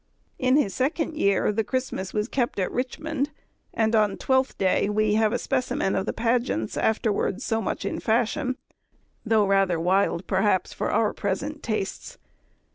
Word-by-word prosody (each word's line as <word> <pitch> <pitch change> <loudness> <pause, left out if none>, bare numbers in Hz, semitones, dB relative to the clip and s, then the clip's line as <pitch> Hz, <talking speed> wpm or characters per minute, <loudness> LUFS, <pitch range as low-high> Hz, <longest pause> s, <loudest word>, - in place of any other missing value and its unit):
In 255 +1 +3
his 205 -11 +1
second 305 - -1
year 200 -6 +2
the 220 +2 0
Christmas 255 -6 -3
was 210 0 -1
kept 245 -4 -1
at 185 -2 -1
Richmond, 290 +3 -2 0.4
and 220 0 +1
on 210 -1 +4
the - - -7
Twelfth 260 0 +1
Day 190 +1 +2
we 210 0 +2
have 215 0 +3
a - - +1
specimen 245 -6 -1
of 190 +2 -1
the - - +1
pageants 230 - 0
afterwards 220 0 0
so 225 -1 0
much - - -3
in - - -2
fashion, 240 +3 0 0.7
though 220 -2 +3
rather 195 -3 +2
wild 185 +1 +1
perhaps 190 -1 +1
for - - -2
our 220 -2 +2
present 275 +10 -3
tastes. 215 -4 -4
220 Hz, 165 wpm, -25 LUFS, 195-255 Hz, 0.7 s, on